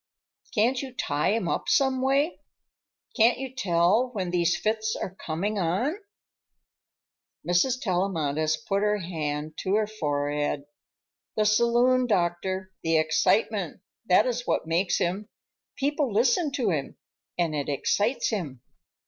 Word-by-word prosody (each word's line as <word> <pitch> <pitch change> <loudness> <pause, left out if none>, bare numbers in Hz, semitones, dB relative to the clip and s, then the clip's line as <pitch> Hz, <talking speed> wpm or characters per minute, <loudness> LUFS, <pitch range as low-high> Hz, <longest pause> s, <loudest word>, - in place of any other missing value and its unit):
Can't 245 +4 +2
you 265 -2 -7
tie 145 -3 0
him 225 -6 -1
up - - -2
someway? 275 0 +2 0.8
Can't 235 +1 +4
you 265 -1 -6
tell 195 +2 +2
when 185 -5 -3
these 175 0 +2
fits 220 +2 -1
are 185 - -5
coming 195 +4 -3
on?" 195 - 0 1.5
Mrs. 235 +9 +2
Tellamantez 160 - 0
put 195 0 -2
her 210 0 +2
hand 155 -4 -4
to 190 +1 0
her 215 0 +2
forehead. 145 -7 -2 0.7
"The 215 - +3
saloon, 240 +3 +3
doctor, 185 -1 -1
the 165 0 +2
excitement; 180 +4 +1 0.3
that 185 +4 +5
is 245 -1 -2
what - - 0
makes 170 +3 +1
him. 195 +5 -2 0.5
People 285 -2 0
listen 260 - +2
to 240 -8 0
him, 140 -5 -3 0.4
and 170 -3 0
it 145 -1 -2
excites 205 - 0
him." 150 - -4
195 Hz, 130 wpm, -26 LUFS, 165-240 Hz, 1.5 s, that